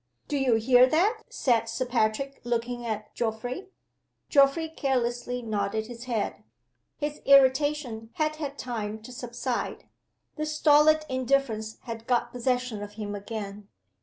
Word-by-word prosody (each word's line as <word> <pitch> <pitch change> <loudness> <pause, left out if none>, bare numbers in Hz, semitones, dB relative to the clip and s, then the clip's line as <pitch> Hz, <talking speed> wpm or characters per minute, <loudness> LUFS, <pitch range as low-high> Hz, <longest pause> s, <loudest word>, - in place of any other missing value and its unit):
"Do 295 - -2
you 265 -4 +3
hear 245 +3 +6
that?" 405 - +2
said 230 -3 +1
Sir 240 +3 -2
Patrick, 245 +3 0
looking 240 0 -2
at 215 -1 -4
Geoffrey. 245 - -3 0.6
Geoffrey 280 +3 +4
carelessly 245 -4 -1
nodded 215 0 -1
his 240 +1 -9
head. 230 -5 -2 0.5
His 295 0 -4
irritation 270 -4 +4
had 310 0 -1
had 285 -2 -5
time 220 -3 -4
to 250 - -10
subside; 245 0 -4 0.5
the 305 0 -2
stolid 305 0 +5
indifference 255 -4 0
had 230 -2 -7
got 245 -2 +1
possession 250 -3 -1
of 205 0 -7
him 210 -1 -5
again. 205 -1 -6
245 Hz, 135 wpm, -27 LUFS, 225-275 Hz, 0.6 s, hear